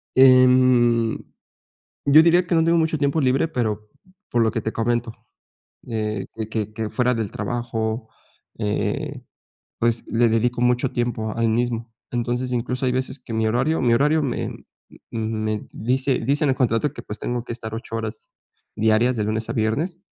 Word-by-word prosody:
Em, 125 -3 +5 0.9
yo 145 +2 +8
diría 175 +2 +4
que 175 -1 0
no 165 - +4
tengo 165 +1 +3
mucho 160 -1 +1
tiempo 145 +2 +1
libre, 135 +3 +2
pero, 110 -8 -2 0.4
por 120 - +2
lo 110 -1 +3
que - - -2
te 110 - -2
comento, 120 0 -1 0.7
eh, 110 -3 -2
que 110 -1 -4
que 105 -1 -3
que 110 -1 -3
fuera 125 +1 +1
del 110 -4 -3
trabajo, 115 0 -3 0.5
eh, 105 -2 -2 0.6
pues, 115 0 0
le 120 +1 +3
dedico 120 +2 +1
mucho 125 +1 +2
tiempo 120 -3 -2
al 115 -1 +2
mismo. 115 0 -1 0.2
Entonces, 120 +1 -2
incluso 125 +2 -1
hay 125 - +1
veces 130 +2 -2
que 125 - -10
mi 110 0 +1
horario 130 +8 +1
mi 120 -2 +3
horario 150 +5 +3
me, 135 -4 -2 0.6
mm, 115 - -5 0.3
me 110 -1 -3
dice 130 +4 0
dice 140 +6 0
en 145 - +3
el 130 - 0
contrato 125 +3 +1
que, - - -9
pues, 105 - -8
tengo 120 -1 -3
que - - -5
estar 110 -2 -7
8 115 0 -5
horas 110 -1 -6 0.5
diarias, 110 +3 +3
de 105 - 0
lunes 110 +1 -2
a - - -1
viernes, 150 - -1
120 Hz, 175 wpm, -22 LUFS, 110-130 Hz, 0.9 s, yo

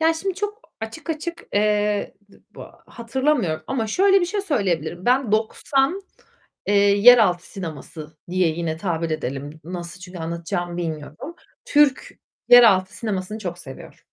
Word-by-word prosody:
Yani, 325 +1 +3
şimdi 385 +3 -3
çok 415 +3 -4 0.2
açık 270 +10 -6
açık, 335 +2 -5
eee, 210 0 +1 0.2
d - - -19 0.2
bu - - -9 0.2
hatırlamıyorum 235 - -1
ama 245 -4 -2
şöyle 390 - +4
bir 350 - 0
şey 405 +3 -2
söyleyebilirim. 180 - -2
Ben 250 -3 +2
90, 270 - +1 0.7
eee, 205 - +1
yeraltı 200 -2 +5
sineması 155 -3 -8
diye 185 -1 +2
yine 160 0 -3
tabir 165 -2 -2
edelim. 145 0 -5
Nasıl, 175 0 -7
çünkü 180 -1 -10
anlatacağımı 170 +1 -4
bilmiyorum. 160 - -6 0.3
Türk 290 -2 +3 0.4
yeraltı 205 -6 +6
sinemasını 210 -1 -3
çok 175 -4 -5
seviyorum, 135 -6 -11
205 Hz, 135 wpm, -22 LUFS, 170-265 Hz, 0.7 s, yeraltı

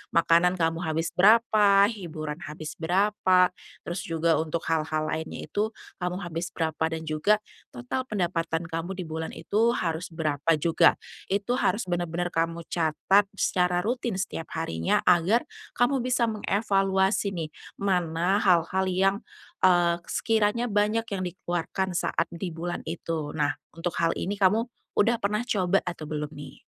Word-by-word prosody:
makanan 170 +2 +4
kamu 165 -2 0
habis 160 -1 -2
berapa, 205 0 +5
hiburan 155 -7 -6
habis 155 +1 -6
berapa, 185 +1 +3 0.3
terus 175 +2 -4
juga 165 -1 +2
untuk 160 +1 -2
hal-hal 155 -1 0
lainnya 160 0 -4
itu 215 +2 -2 0.2
kamu 180 +1 -3
habis 170 0 -5
berapa, 160 -1 -1
dan 160 0 -4
juga 155 +7 +2 0.4
total 125 - -3
pendapatan 170 -5 -1
kamu 165 +3 -4
di 185 - -4
bulan 160 0 -5
itu 230 +3 +1
harus 165 -2 -2
berapa 160 -1 0
juga. 160 +2 +4 0.3
Itu 205 +6 0
harus 230 - +1
bener-bener 175 -1 -2
kamu 165 +1 -1
catat 175 +5 +2
secara 180 -2 +1
rutin 240 -1 -1
setiap 185 -4 -4
harinya, 85 - 0
agar 180 +7 +4 0.3
kamu 245 +3 +2
bisa 255 -1 +1
mengevaluasi, 195 -2 +1
nih. 165 -4 -4 0.2
Mana 180 -1 +1
hal-hal 185 -1 +2
yang, 190 +1 +2 0.5
eee, 175 -2 +4
sekiranya 225 +2 +1
banyak 210 +2 +1
yang 195 -2 -2
dikeluarkan 175 +1 -3
saat - - 0
di 170 0 -5
bulan 175 +2 -5
itu. 160 -2 -4
Nah, 145 -2 0 0.2
untuk 165 +1 -3
hal 165 0 +2
ini 200 +3 -3
kamu 210 +5 +2 0.2
sudah 230 +3 +3
pernah 210 +2 0
coba 195 -4 +2
atau 175 -3 -5
belum, 150 -1 -4
nih? 145 -2 -11
175 Hz, 145 wpm, -26 LUFS, 165-200 Hz, 0.5 s, berapa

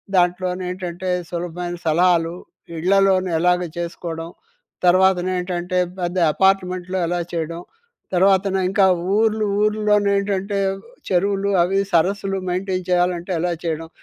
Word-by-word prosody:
దాంట్లో 180 0 +2
నేంటంటే 180 0 -5 0.2
సులభమైన 175 0 -4
సలహాలు, 170 +1 +2 0.4
ఇళ్లలోనే 190 0 +3
ఎలాగ 180 +1 +2 0.2
చేసుకోవడం, 170 -1 -5 0.6
తర్వాత 185 +1 +5
నేంటంటే 180 0 -2 0.2
పెద్ద 175 +1 -2 0.2
అపార్ట్మెంట్‌లో 185 -1 +1
ఎలా 175 0 -1
చేయడం, 165 +1 -3 0.5
తర్వాత 190 +2 +4
నింకా 190 +2 +2 0.3
ఊర్లు 220 -1 +2 0.2
ఊర్లోనే 210 -1 +2
ఏంటంటే 200 0 -1 0.5
చెరువులు 195 +2 +1
అవి 195 +3 +1
సరస్సులు 195 +3 +1
మెయింటైన్ 185 0 -2
చేయాలంటే 180 0 +1
ఎలా 175 -1 0
చేయడం, 160 0 -3
180 Hz, 105 wpm, -21 LUFS, 175-195 Hz, 0.6 s, తర్వాత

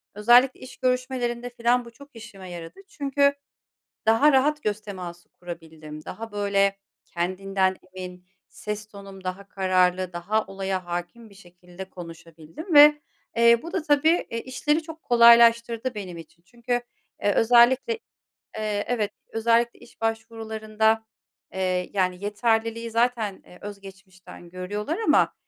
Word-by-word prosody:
özellikle 240 +5 +5
iş 255 - -11
görüşmelerinde 250 -1 -1
falan 240 +1 +1
bu 235 - -12
çok 280 +5 -16
işime 200 -5 -11
yaradı 170 - -9
çünkü 280 -3 +1 0.7
daha 225 +7 +5
rahat 295 +3 +2
göz 210 0 -1
teması 180 -4 -9
kurabildim. 160 -3 -10
Daha, 225 0 -7
böyle, 200 -1 +1 0.3
kendinden 190 +2 -1 0.2
emin, 180 -1 -9 0.2
ses 210 0 -6
tonum 195 -2 -12
daha 190 +2 -5
kararlı, 185 -1 +1
daha 200 +6 -1
olaya 190 -1 -4
hâkim 175 +6 -6
bir 200 - -18
şekilde 180 0 -12
konuşabildim 165 - -9
ve, 295 0 +8 0.4
eee, 235 0 +6
bu 335 - -8
da 365 -5 -1
tabii, 310 +3 +2
e, 230 - -4
işleri 295 +5 -1
çok 320 0 -10
kolaylaştırdı 235 0 +5
benim 185 -4 -6
için. 165 +1 -14
Çünkü, 245 +4 -3 0.4
eee, 205 - +3
özellikle 245 - +4 0.6
eee, 210 -1 -1
evet, 220 -4 -1 0.2
özellikle 230 +1 +1
iş 235 - -19
başvurularında, 220 -1 -1 0.5
eee, 185 -1 -1
yani, 185 -1 -1
yeterliliği 230 +2 -1
zaten, 230 -4 0
eee, 180 - -16
öz 205 -1 -8
geçmişten 190 -3 -14
görüyorlar 205 - -4
ama, 445 - +3
215 Hz, 130 wpm, -25 LUFS, 185-240 Hz, 0.7 s, ve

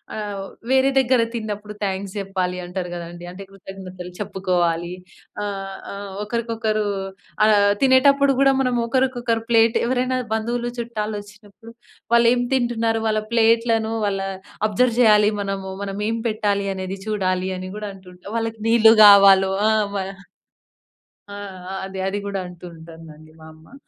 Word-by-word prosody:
ఆహ్, 205 -2 -5 0.3
వేరే 265 +1 +4
దగ్గర 255 -2 +4
తిన్నప్పుడు 210 -2 -5
థాంక్స్ 195 0 -3
చెప్పాలంటారు 180 -2 -3
గదండీ. 175 0 -8
అంటే, 195 +2 -9
కృతజ్ఞతలు 185 -2 -10
చెప్పుకోవాలి. 180 -4 -1 0.5
ఆహ్, 195 -1 -5 0.2
ఆహ్, 200 0 -7
ఒకరికొకరు 220 -1 -2 0.6
ఆహ్, 205 -1 +4
తినేటప్పుడు 275 +1 +5
కూడా 275 0 +5
మనం 250 -2 0
ఒకరికొకరు 240 -2 0
ప్లేట్ 230 -1 +4
ఎవరైనా 255 +1 0 0.2
బంధువులు 235 +2 -2
చుట్టాలొచ్చినప్పుడు 215 -1 -7 0.4
వాళ్ళు 235 0 +6
ఏం 245 - 0
తింటున్నారు, 230 -3 0
వాళ్ళ 215 0 +1
ప్లేట్లను 230 -1 +2
వాళ్ళ 195 -1 -1 0.5
అబ్జర్వ్ 230 +3 +1
చేయాలి 210 -2 +5
మనము. 195 -1 -4
మనం 195 0 -5
ఏం 230 - -1
పెట్టాలి 205 -2 -1
అనేది 190 +1 -5
చూడాలని 185 -2 -2
కూడా 210 -1 -5
అంటుంటారు. 185 +2 -12
వాళ్ళకి 225 -1 -3
నీళ్ళు 225 -1 +7
కావాలో 195 -1 +7 0.2
ఆహ్, 215 -1 +2
మన 190 -1 -3 1.3
ఆ! - - -7 0.4
ఆ! - - -5 0.3
అది 200 +1 -2
కూడా 200 -1 -3
అంటూ 180 0 -13
ఉంటుందండి 160 -1 -13
మా 160 - -13
అమ్మ. 160 +10 -18
210 Hz, 130 wpm, -21 LUFS, 190-230 Hz, 1.3 s, నీళ్ళు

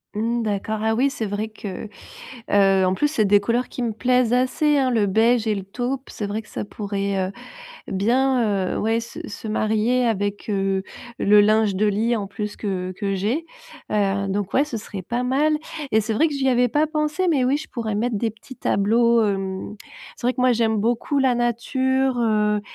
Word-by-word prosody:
Mmh. 230 +2 0
D'accord, 215 +1 -2
ah 220 0 +2
oui, 260 +5 +2
c'est 250 -5 -4
vrai 205 +1 -3
que, 210 -3 -7 0.7
heu, 195 -1 +4
en 185 - +2
plus, 295 +10 +1
c'est 230 -8 +1
des 205 0 +5
couleurs 235 +4 0
qui 250 - -5
me 235 -2 -1
plaisent 250 +1 +2
assez, 275 +4 +2
hein, 265 -2 +2
le 220 -4 +2
beige 225 +3 +3
et 215 - +2
le 195 -2 -5
taupe. 250 +6 -4
C'est 210 - -4
vrai 210 +2 -3
que - - -21
ça - - -5
pourrait, 200 -2 -2
heu, - - -12 0.6
bien, 225 -2 +1
heu, - - -2
ouais, 225 +1 +1
se 230 - -8
se 215 - -8
marier 220 +3 +1
avec, 205 -2 -2
heu, 195 -1 0 0.4
le 205 +1 +5
linge 215 -1 +3
de 210 +2 +2
lit 220 +4 +1
en 205 -2 -3
plus 210 +1 -5
que 185 -3 -3
que 200 -1 -2
j'ai. 225 - -1 0.5
Heu, 200 -1 +1
donc 195 0 -2
ouais, 275 - +3
ce 295 -6 -5
serait 205 -3 -7
pas 240 +7 -2
mal 285 +5 +2 0.4
et 220 - +5
c'est 220 +1 -2
vrai 305 +10 +3
que 300 - -5
j'y 270 -1 0
avais 250 -1 +3
pas 300 +6 +2
pensé, 305 +4 -1
mais 285 -6 +2
oui, 265 +3 +2
je 310 +1 -7
pourrais 225 -4 -3
mettre 225 +2 0
des 225 +1 0
petits 230 +4 -14
tableaux, 230 +3 +3
hem, 195 0 -3 0.4
c'est - - -4
vrai 250 - +3
que - - -4
moi, 255 0 +4
j'aime 225 -1 +1
beaucoup 235 +6 0
la 260 -2 +3
nature, 260 +2 0
heu 210 -2 +2
220 Hz, 210 wpm, -22 LUFS, 205-250 Hz, 0.7 s, des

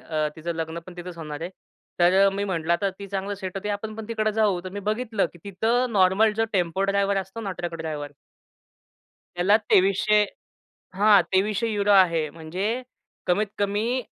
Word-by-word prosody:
अ, 155 -1 -1
तिचं 170 +1 -4
लग्नपण 165 +2 -6
तिथेच 175 0 -8
होणार 150 -3 -6
आहे. 170 +2 -4 0.5
तर 190 +3 +5
मी 200 +1 -2
म्हटलं, 170 -5 -3
की - - -1
"आता 195 +3 +1
ती 200 - -7
चांगली 195 +1 -3
सेट 190 -1 -6
होती, 195 +2 -4
आपण 210 +1 -3
पण 220 - -7
तिकडे 215 -2 0
जाऊ." 210 -4 +2
तर - - -4
मी 205 +2 -6
बघितलं 220 -1 0
की, 175 - -16
तिथं 225 +6 0
नॉर्मल 195 +3 +4
जो 225 - +2
टेम्पो-ड्रायव्हर 195 +2 +1
असतो 195 +3 -4
ना, 205 -3 -4
ट्रक-ड्रायव्हर 160 -4 -4 1.3
त्याला 185 +4 +4
2300 200 +3 +4 0.7
हां, 205 0 +6
€2300 205 +1 +1
आहे, 170 -5 +4
म्हणजे 165 +5 -4 0.6
कमीत-कमी 205 +5 0
195 Hz, 155 wpm, -25 LUFS, 175-210 Hz, 1.3 s, हां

